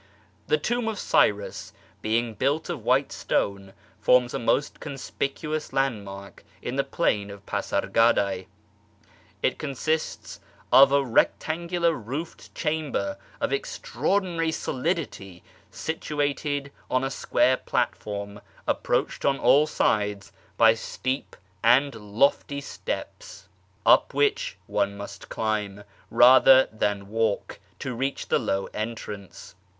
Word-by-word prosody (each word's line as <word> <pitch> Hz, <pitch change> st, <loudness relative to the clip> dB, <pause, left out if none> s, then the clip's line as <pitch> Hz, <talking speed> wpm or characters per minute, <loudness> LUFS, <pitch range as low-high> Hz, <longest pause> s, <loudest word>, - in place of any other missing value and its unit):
The 155 Hz, -, +3 dB
Tomb 240 Hz, +8 st, -1 dB
of 220 Hz, -2 st, -2 dB
Cyrus, 105 Hz, -, +1 dB, 0.3 s
being 115 Hz, +1 st, 0 dB
built 145 Hz, -, 0 dB
of 145 Hz, -10 st, -6 dB
white 130 Hz, +4 st, +2 dB
stone, 100 Hz, -1 st, -2 dB, 0.3 s
forms 125 Hz, -1 st, +4 dB
a -, -, -1 dB
most 140 Hz, +5 st, 0 dB
conspicuous 150 Hz, +2 st, -4 dB
landmark 100 Hz, -7 st, -3 dB, 0.2 s
in 120 Hz, +5 st, -5 dB
the 140 Hz, -, +2 dB
plain 105 Hz, -8 st, 0 dB
of 100 Hz, 0 st, -11 dB
Pasargad?e. 100 Hz, -5 st, +1 dB, 1.0 s
It -, -, +1 dB
consists 155 Hz, +2 st, -3 dB, 0.3 s
of 135 Hz, +1 st, +8 dB
a 140 Hz, 0 st, +3 dB
rectangular 170 Hz, +7 st, +1 dB
roofed 140 Hz, +6 st, -7 dB
chamber 150 Hz, -11 st, -2 dB, 0.2 s
of -, -, -1 dB
extraordinary 165 Hz, +3 st, -1 dB
solidity, 130 Hz, -, -3 dB, 0.3 s
situated 145 Hz, -2 st, -2 dB, 0.2 s
on 130 Hz, +1 st, +1 dB
a 135 Hz, -, -1 dB
square 125 Hz, 0 st, +2 dB
platform 100 Hz, 0 st, -3 dB, 0.2 s
approached -, -, 0 dB
on 135 Hz, -1 st, +2 dB
all 150 Hz, +2 st, +5 dB
sides 105 Hz, -7 st, 0 dB, 0.3 s
by 115 Hz, -1 st, +7 dB
steep 130 Hz, +4 st, -4 dB, 0.3 s
and 130 Hz, +5 st, +5 dB
lofty 115 Hz, +7 st, 0 dB
steps, -, -, -6 dB, 0.4 s
up -, -, +5 dB
which 460 Hz, +4 st, +1 dB
one 100 Hz, -1 st, -1 dB
must 100 Hz, 0 st, -9 dB
climb, 105 Hz, -2 st, -2 dB, 0.3 s
rather 130 Hz, +1 st, +7 dB
than 105 Hz, -2 st, -1 dB
walk, 110 Hz, 0 st, -1 dB, 0.2 s
to 130 Hz, -, -4 dB
reach 135 Hz, +3 st, -3 dB
the -, -, +3 dB
low 95 Hz, 0 st, -1 dB
entrance. 105 Hz, -3 st, -6 dB
130 Hz, 115 wpm, -26 LUFS, 105-150 Hz, 1.0 s, of